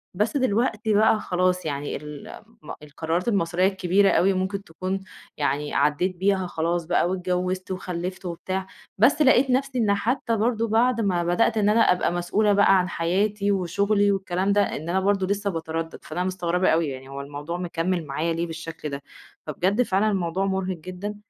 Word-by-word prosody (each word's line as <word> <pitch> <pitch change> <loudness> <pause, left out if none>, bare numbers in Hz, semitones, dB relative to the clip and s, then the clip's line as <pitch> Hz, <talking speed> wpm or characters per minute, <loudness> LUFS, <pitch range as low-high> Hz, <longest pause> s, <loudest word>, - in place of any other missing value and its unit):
بس 215 +8 0
دلوقتي 220 -3 +1
بقى 215 +1 +4
خلاص 180 -2 0
يعني، 145 -1 -3
ال 150 -1 -9 0.2
م 150 - -9
القرارات 160 +6 -3
المصيرية 185 -3 +2
الكبيرة 195 +1 +2
أوي 195 +3 +3
ممكن 190 +1 -2
تكون، 185 +3 -4 0.4
يعني 145 0 -1
عديت 150 +6 +1
بيها 190 0 +1
خلاص 170 0 -1
بقى 175 +1 +1
واتجوزت 185 0 -2
وخلفت 185 0 -5
وبتاع، 185 +2 -4 0.3
بس 270 +9 +4
لقيت 265 -1 +5
نفسي 260 0 0
إن 210 -4 +3
حتّى 230 +2 0
برضو 230 +1 0
بعد 230 +2 +2
ما 180 -4 +1
بدأت 200 +6 +2
إن 210 -1 +3
أنا 225 +2 +4
أبقى 180 -1 +1
مسؤولة 205 +4 +1
بقى 200 -1 +5
عن 180 - -1
حَياتِي 200 +5 0
وشُغلي 200 +3 +1
والكلام 190 0 0
ده، 205 - +4
إن 155 +3 -6
أنا 190 +2 +2
برضو 195 0 +1
لسه 200 +1 -1
باتردد، 165 -1 -4
فأنا 180 - -3
مستغربة 185 -1 0
أوي 160 -1 +2
يعني 135 0 -8
هو 140 0 -6
الموضوع 145 +4 -6
مكمل 175 -1 -2
معايا 155 +4 -1
ليه 170 +1 -2
بالشكل 160 -1 -6
ده، 140 0 -5 0.5
فبجد 190 - +1
فعلًا 210 -1 +2
الموضوع 185 0 -1
مرهق 190 -2 -2
جدًا. 185 +5 -6
185 Hz, 170 wpm, -24 LUFS, 170-205 Hz, 0.5 s, لقيت